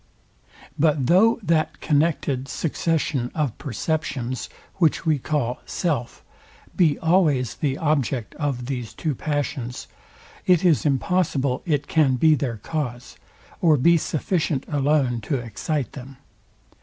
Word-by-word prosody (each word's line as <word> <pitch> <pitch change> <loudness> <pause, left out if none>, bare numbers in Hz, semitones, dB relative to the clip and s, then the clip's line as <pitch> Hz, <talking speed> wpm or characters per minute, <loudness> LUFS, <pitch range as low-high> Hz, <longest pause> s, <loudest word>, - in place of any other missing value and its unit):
But 150 -3 +3
though 215 - +4
that 160 -3 +1
connected 145 -4 0
succession 150 -5 -1
of 150 -8 -1
perceptions, 140 -3 -3 0.3
which 165 -4 +2
we 155 -3 +2
call 130 -4 -1
SELF, 145 -9 -2 0.5
be 160 -5 +3
always 160 - +2
the 140 -2 -2
object 140 -8 -1
of 140 -5 -2
these 125 -3 -5
two 155 -3 -2
passions, 135 -4 -3 0.6
it 180 -1 +4
is 160 -3 +3
impossible 140 -2 0
it 145 -3 +1
can 145 -5 +3
be 155 +5 +5
their 125 -5 -1
CAUSE, 125 0 -5 0.5
or 160 -3 +5
be 170 +6 +5
sufficient 155 -2 -1
alone 140 -4 +1
to 140 - -2
excite 120 +3 -3
them. 135 0 -10
145 Hz, 120 wpm, -23 LUFS, 130-160 Hz, 0.6 s, be